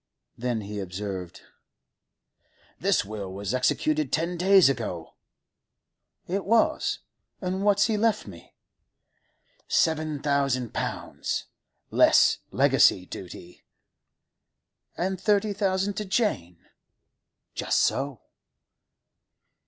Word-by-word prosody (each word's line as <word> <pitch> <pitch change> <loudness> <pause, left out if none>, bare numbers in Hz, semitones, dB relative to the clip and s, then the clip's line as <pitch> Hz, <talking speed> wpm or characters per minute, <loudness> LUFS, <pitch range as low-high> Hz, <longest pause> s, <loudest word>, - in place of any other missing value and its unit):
Then 120 -2 -2
he 105 0 -6
observed: 95 -1 -6 1.4
'The - - +2
will 100 -2 -6
was 100 +2 -4
executed 305 - +1
ten 170 +3 0
days 190 0 +6
ago.' 105 -11 -3 1.1
'It 195 +2 -2
was? 225 +3 +1 0.4
And 190 +1 -3
what's 205 0 +4
he 220 -2 0
left 220 0 +1
me?' 90 -5 -13 1.1
'Seven 155 -2 +1
thousand 140 -4 0
pounds—less - - 0
legacy 90 - +4
duty.' 90 -1 -10 1.3
'And 190 +1 -2
thirty 210 -1 +2
thousand 195 0 0
to 210 - -2
Jane?' 140 - -1 0.9
'Just - - 0
so. 135 -2 -1
150 Hz, 90 wpm, -26 LUFS, -, 1.4 s, days